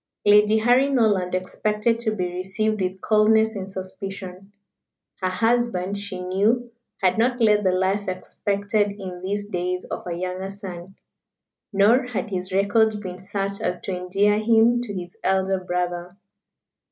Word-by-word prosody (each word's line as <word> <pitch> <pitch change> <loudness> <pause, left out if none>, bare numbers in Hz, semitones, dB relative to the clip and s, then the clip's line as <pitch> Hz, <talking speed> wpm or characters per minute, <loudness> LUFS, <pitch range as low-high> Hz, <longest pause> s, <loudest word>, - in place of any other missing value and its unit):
Lady 210 +1 +6
Harry 245 +5 +4
Norland 205 -9 +2
expected 210 +5 0
to 235 -2 -1
be 180 -3 -1
received 195 +4 -1
with 185 +1 -2
coldness 220 +1 +3
and 195 -1 -6
suspicion. 190 0 -7 0.7
Her 185 - +1
husband, 215 -1 0
she 200 -2 -5
knew, 215 +7 +1 0.3
had 185 +3 +3
not 245 +2 +2
led 210 -2 +4
the 185 - +3
life 190 +2 0
expected 200 +2 -1
in 180 -2 -7
these 205 +2 -2
days 180 -2 -3
of - - -6
a 170 - -3
younger 185 +2 -4
son. 190 -2 -9 0.8
Nor 225 +6 +4
had 220 -3 -4
his 185 0 -4
record 210 +3 +2
been 185 -3 -7
such 195 +1 -4
as 180 - -1
to 190 - -3
endear 200 +3 +1
him 230 +2 +4
to 240 -4 -5
his 180 -3 -6
elder 190 0 +1
brother. 180 0 -3
200 Hz, 150 wpm, -23 LUFS, 185-215 Hz, 0.8 s, Lady